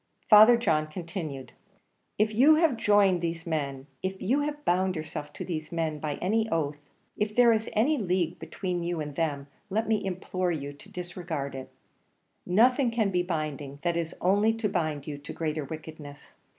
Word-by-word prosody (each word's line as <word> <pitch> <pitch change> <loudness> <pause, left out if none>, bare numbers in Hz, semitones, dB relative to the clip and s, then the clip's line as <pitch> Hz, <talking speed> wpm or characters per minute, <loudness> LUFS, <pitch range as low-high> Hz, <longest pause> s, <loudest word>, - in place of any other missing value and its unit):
Father 215 +3 +9
John 155 -9 +1
continued: 155 -6 -6 0.7
"If 215 +1 +2
you 275 +8 +6
have 315 -4 +3
joined 205 -5 +3
these 165 0 -3
men, 140 -5 -3 0.2
if 190 0 -3
you 250 +9 +1
have 295 0 -3
bound 185 +1 +2
yourself 155 -2 -6
to - - -6
these 155 -3 -5
men 160 -3 -2
by 150 -1 -3
any 220 +4 0
oath, 150 -3 -1 0.4
if 210 0 -1
there 240 -1 +6
is 220 0 -1
any 270 +7 +2
league 180 -4 0
between 175 +2 -4
you 170 -1 -2
and 150 -1 -4
them, 145 -4 -1 0.2
let 220 +3 0
me 220 -2 +1
implore 185 -1 -2
you 145 -3 -4
to 145 - -15
disregard 175 -6 -5
it; 130 -1 -7 0.8
nothing 245 +7 +4
can 225 -4 0
be 180 -1 +2
binding, 155 -5 -4
that 170 -1 +1
is 170 0 -3
only 205 +4 +3
to 225 -1 -1
bind 155 -7 -2
you 145 -2 -6
to 145 - -8
greater 155 -2 -2
wickedness. 155 -1 -10
175 Hz, 175 wpm, -28 LUFS, 155-210 Hz, 0.8 s, Father